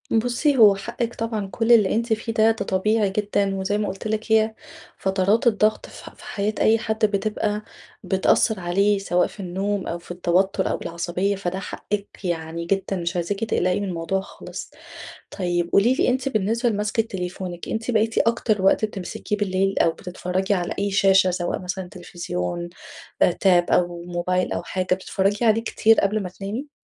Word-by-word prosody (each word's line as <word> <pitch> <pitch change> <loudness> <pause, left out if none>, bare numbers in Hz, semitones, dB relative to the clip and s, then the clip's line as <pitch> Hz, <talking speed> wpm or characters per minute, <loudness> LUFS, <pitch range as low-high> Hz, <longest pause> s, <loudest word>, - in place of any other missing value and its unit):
بُصي 245 +5 +2
هو 210 -4 +7
حقِك 235 +4 -4
طبعًا 225 -3 -3
كُلّ 225 +5 0
اللي 215 -5 +5
أنتِ 230 0 +1
فيه 225 +1 -3
ده، 220 0 +4
ده 220 -3 -3
طبيعي 210 +2 +1
جدًا، 200 0 0
وزي 195 +2 -1
ما 210 -1 -1
قُلت 195 +3 -5
لِك 220 +1 -3
هي 220 0 +4 0.4
فترات 195 +5 +1
الضغط 215 -1 +2
في - - -12
ح - - -8
في - - -16
حياة 205 +1 -2
أي 225 +1 +4
حد 220 0 0
بتبقى 210 0 -1 0.4
بتأثّر 195 +2 +2
عليه، 195 +3 +2
سواء 180 -2 +1
في - - -16
النوم 195 +1 -2
أو 170 - -3
في 170 - -12
التوتر 185 +2 +1
أو - - -1
بالعصبية، 175 +4 -2
فده 190 -1 -3
حقِك 200 +1 -4 0.2
يعني 165 -1 -3
جدًا، 195 +2 -1
مش 170 +1 -3
عايزاكِ 180 +3 -2
تقلقي 185 -4 +1
من 200 - -3
الموضوع 180 +2 -2
خالص. 195 - -9 0.6
طيب 175 -2 -1
قولي 235 +6 +4
لي - - +1
أنتِ 255 +1 +1
بالنسبة 225 +1 0
لمسكة 210 +1 0
تليفونِك، 180 -3 -6
أنتِ 225 +2 -2
بقيتِ 225 -1 +1
أكتر 225 -3 +1
وقت 195 +3 +4
بتمسكيه 210 0 -4
بالليل، 195 -1 0
أو - - +4
بتتفرّجي 185 +3 -2
على 175 -2 -2
أي 200 0 0
شاشة 195 -1 +4
سواء 175 -1 -2
مثلًا 180 0 -4
تليفزيون، 175 - -5 0.5
آآ - - +6
Tab 175 -1 +3
أو 175 -1 +1
موبايل 180 +1 -1
أو - - -2
حاجة، 185 -1 -1
بتتفرّجي 195 +3 -1
عليه 225 0 +4
كتير 225 -1 +3
قبل 205 +1 +1
ما 180 - -5
تنامي؟ 210 +10 -6
195 Hz, 175 wpm, -23 LUFS, 180-215 Hz, 0.6 s, هو